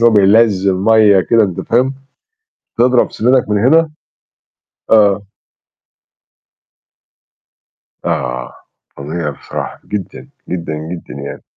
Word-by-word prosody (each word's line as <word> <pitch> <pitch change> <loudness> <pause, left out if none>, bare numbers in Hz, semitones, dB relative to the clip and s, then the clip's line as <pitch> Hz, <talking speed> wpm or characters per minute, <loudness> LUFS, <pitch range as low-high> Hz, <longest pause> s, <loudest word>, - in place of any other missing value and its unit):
إن 120 - +5
هو 115 - +5
بينزِّل 100 -1 +3
مَيّة 105 0 +4
كده، 115 +5 +2
أنت 95 -4 -4
فاهم؟ 130 +3 0 0.8
تضرب 125 +1 +3
سِنانَك 125 +1 +1
من 105 -1 +1
هنا 160 +3 +4 1.0
آه. 105 -2 +4 2.8
آه، 60 0 -3 0.4
فظيع 75 +2 -4
بصراحة 70 - -7
جدًا، 100 -4 -6 0.2
جدًا، 85 -3 -4
جدًا 80 +3 -8
يعني. - - -8
105 Hz, 100 wpm, -15 LUFS, 90-115 Hz, 2.8 s, إن